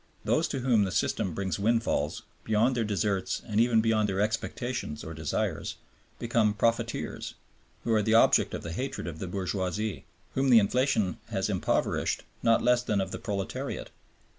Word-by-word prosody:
Those - - +2
to 135 - -3
whom 120 -5 +3
the 95 - -1
system 90 -2 0
brings 95 -4 -2
windfalls, 110 -8 0 0.2
beyond 110 +4 +2
their 120 - +1
deserts 100 -2 -1
and 105 -2 0
even 115 -2 +4
beyond 110 -2 +2
their 95 0 -1
expectations 110 - -2
or 80 - -6
desires, 80 -1 -2 0.4
become 115 -3 +1
"profiteers,", 115 +1 -1 0.5
who 115 - +1
are 110 - +4
the 110 +2 +2
object 115 - +5
of - - -6
the 85 - -5
hatred 130 +9 -4
of 80 -2 -6
the 95 - -4
bourgeoisie, 95 +2 -2 0.3
whom 135 0 +1
the 120 - +8
inflationism 110 - +2
has - - -1
impoverished, - - 0 0.2
not 115 0 +3
less 125 0 +4
than 105 -4 0
of 95 - -2
the - - -5
proletariat. 100 -3 -4
110 Hz, 165 wpm, -28 LUFS, 95-115 Hz, 0.5 s, the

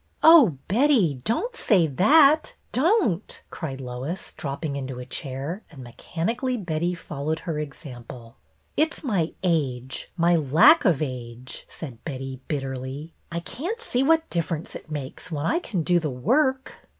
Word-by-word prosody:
" - - -31
Oh, 295 - +8
Betty, 205 - +3
don't 460 - 0
say 190 - +3
that, 285 - +5 0.2
don't! 265 - +1
" - - -41
cried 135 -6 -5
Lois, 130 +7 -5
dropping 140 +1 -4
into 130 -2 -5
a 125 - -7
chair, 140 - -4
and 135 -5 -11
mechanically 230 - -3
Betty 175 -2 -1
followed 155 0 -4
her 160 -4 -3
example. 125 -5 -9 0.2
" - - -42
It 315 +1 +2
's - - -9
my 190 - 0
age, 135 -8 -1
my 170 0 +4
lack 165 - +6
of 160 -6 +3
age," 125 -2 -7
said 125 -8 -9
Betty, 135 -3 -6
bitterly. 135 +2 -4
" - - -40
I 170 0 -3
can't 350 - -4
see 260 - -1
what 320 +3 +3
difference 165 -2 -2
it - - -10
makes 145 0 -6
when 150 -1 -2
I 335 - +2
can 195 - -3
do 175 +2 +3
the 160 -2 -2
work." 260 - 0
165 Hz, 160 wpm, -25 LUFS, -, 0.2 s, Oh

